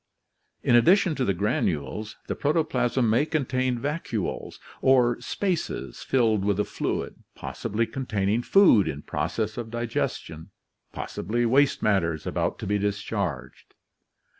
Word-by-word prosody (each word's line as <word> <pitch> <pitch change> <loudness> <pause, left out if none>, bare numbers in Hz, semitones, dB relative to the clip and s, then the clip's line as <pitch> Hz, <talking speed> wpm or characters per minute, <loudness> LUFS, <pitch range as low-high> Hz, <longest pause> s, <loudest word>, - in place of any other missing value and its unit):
In 120 - +4
addition 175 - +5
to 135 - -1
the 100 - +1
granules, 95 0 -2
the - - -2
pro 145 +1 0
toplasm 125 -6 +1
may 115 +6 +3
contain 130 -5 0
vacuoles 135 - -3 0.2
or 125 -2 +4
spaces 170 - -3
filled 110 -6 +2
with 100 0 +1
a - - +3
fluid, - - -3 0.2
possibly 115 +3 -2
containing 110 -4 -1
food 120 - +5
in 75 -2 -4
process 85 +9 -2
of 120 -2 -5
digestion, 110 -7 -3 0.4
possibly 120 +6 -2
waste 135 +4 +3
matters 85 -7 +1
about - - -1
to - - -6
be 105 +1 0
discharged. 105 +1 -3
115 Hz, 130 wpm, -26 LUFS, 100-130 Hz, 0.4 s, addition